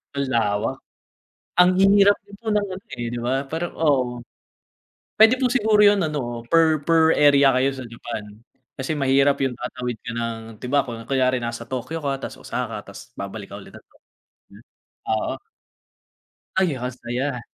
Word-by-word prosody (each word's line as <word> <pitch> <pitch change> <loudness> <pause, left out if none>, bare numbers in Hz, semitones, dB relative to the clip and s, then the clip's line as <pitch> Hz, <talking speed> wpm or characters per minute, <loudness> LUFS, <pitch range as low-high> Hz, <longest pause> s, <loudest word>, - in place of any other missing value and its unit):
Ang 140 - 0
lawak. 110 +2 0 0.8
Ang 180 0 +7 0.3
hirap 205 0 +6
ng 200 - -12 0.2
ano, 200 -2 -4 0.3
eh, 120 - -2
'di 120 - -4
ba 135 +3 0
parang 165 +4 -3
oo. 130 -6 +1 1.0
Pwede 220 +3 +7
po 255 - +3
siguro 220 -4 +3
yun 205 0 +6
ano, 120 -6 -4
per 160 -2 +4
per 160 -1 +4
area 140 -1 +6
kayo 130 +1 +3
sa 130 -1 -7
Japan 115 -2 -6 0.5
kasi 135 +4 -2
mahirap 140 0 +3
yung 130 -2 0
tatawid 125 -1 -4
ka - - -4
ng 115 -1 -2 0.2
'di 125 - -6
ba 140 -1 +3
kun 115 -1 -7
kunyari 130 -2 +2
nasa 120 0 -5
Tokyo 130 +6 -4
ka 135 -1 -1
tas - - -6
Osaka - - -4
tas - - -12
babalik 100 +1 -6
ka 100 - -7
ulit, 100 - -13 0.8
mm, - - -16 0.5
oo. 110 -1 0 1.3
Ay 175 -8 +2
masaya. 125 +1 -3
135 Hz, 155 wpm, -23 LUFS, 120-160 Hz, 1.3 s, Ang